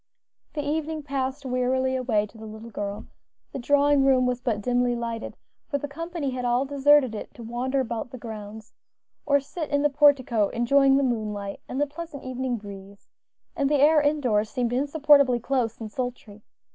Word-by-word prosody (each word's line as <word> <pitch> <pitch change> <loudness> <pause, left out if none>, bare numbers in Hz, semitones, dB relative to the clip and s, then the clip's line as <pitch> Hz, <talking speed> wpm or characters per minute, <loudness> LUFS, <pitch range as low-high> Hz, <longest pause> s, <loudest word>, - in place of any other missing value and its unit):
The 295 - -3
evening 310 0 -2
passed 275 0 -3
wearily 260 +1 0
away 235 -5 +1
to 210 - -18
the 220 0 -9
little 220 +2 -10
girl; 205 -1 -5 0.5
the - - -5
drawing 285 +2 +3
room 260 -2 +4
was 250 0 -1
but 235 -5 -1
dimly 245 +2 +1
lighted, 230 -1 -5 0.3
for 285 - -1
the 290 - -5
company 330 -1 -4
had 255 -1 -4
all 245 +2 +1
deserted 285 -2 +4
it 215 - -7
to 240 - -10
wander 250 +4 -2
about 235 -1 -4
the 255 - -9
grounds, 220 -2 -9 0.5
or 285 0 +4
sit 300 +3 -6
in 285 0 +1
the 295 - +3
portico 265 -7 +3
enjoying 270 +3 +3
the 280 - +2
moonlight 210 -5 -3
and 260 - -3
the 290 - +3
pleasant 295 -1 -8
evening 255 -1 -3
breeze, 200 -1 -12 0.5
and 280 -4 +1
the 295 - +3
air 300 +2 +5
indoors 255 -8 +1
seemed 240 +1 -1
insupportably 280 -2 +4
close 240 -2 -1
and 220 -2 -7
sultry. 240 -4 -6
255 Hz, 180 wpm, -25 LUFS, 230-285 Hz, 0.5 s, air